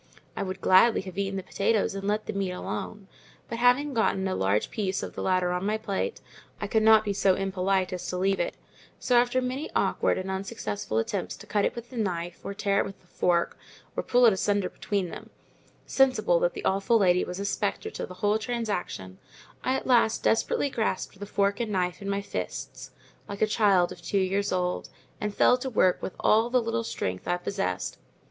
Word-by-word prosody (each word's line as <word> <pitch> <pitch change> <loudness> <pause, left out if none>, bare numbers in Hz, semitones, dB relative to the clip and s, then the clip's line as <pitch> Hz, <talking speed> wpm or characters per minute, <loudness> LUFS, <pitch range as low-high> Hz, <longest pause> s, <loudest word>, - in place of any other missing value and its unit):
I - - -3
would 190 0 -4
gladly 215 +5 +5
have 190 0 -7
eaten 195 0 -1
the 190 - -4
potatoes 200 +3 0
and 195 0 -4
let 210 +1 0
the - - -4
meat 195 -1 -1
alone, 195 +2 -5 0.4
but 230 - -5
having 250 +4 +3
got 225 - +2
a 190 0 -1
large 100 - 0
piece 195 -3 -2
of - - -6
the - - -5
latter 185 -1 +1
on 180 0 -1
to 195 - -2
my 215 +1 +1
plate, 220 - -3 0.4
I - - -3
could 220 +2 +1
not 220 0 +6
be 205 - 0
so 190 -1 +3
impolite 190 -1 0
as 180 - -5
to 180 - -3
leave 195 +1 +1
it; - - -1 0.4
so, 250 - +1
after 245 +1 +3
many 260 +5 -3
awkward - - +2
and 190 0 -3
unsuccessful 150 - -3
attempts 180 - -2
to - - -12
cut 205 -1 +1
it - - -1
with 235 +1 -8
the 250 - -8
knife, 175 -5 -2
or 200 - -5
tear 200 0 +1
it - - +1
with 195 - -10
the - - -28
fork, 175 -1 0 0.4
or - - 0
pull 245 0 +4
it 225 - +7
asunder 200 0 0
between 195 -4 -2
them, - - -9 0.6
sensible 270 - +3
that - - +1
the - - -6
awful 200 +5 +3
lady 180 -4 +3
was 180 +1 -5
a 200 - -3
spectator 435 - -2
to - - -5
the 185 - -10
whole 210 +1 +3
transaction, 205 - -4 0.4
I 260 - +1
at - - -3
last 235 -3 +3
desperately 265 +4 +1
grasped 220 -6 -1
the 205 - -5
knife - - -17 0.3
and 235 -2 -1
fork 180 -1 0
in 200 - -4
my 200 0 0
fists, 95 - -5 0.4
like 200 +1 -2
a - - +6
child 200 -5 +3
of 180 -1 -10
two 185 +4 -1
years 195 +1 +1
old, 180 -1 -1 0.3
and 210 - -2
fell 250 +4 +4
to 265 - -3
work 185 -6 +2
with - - -5
all 225 +2 +3
the 250 +1 +3
little 230 0 -1
strength 95 - -4
I 175 - +1
possessed. 180 - -3
200 Hz, 215 wpm, -27 LUFS, 185-225 Hz, 0.6 s, it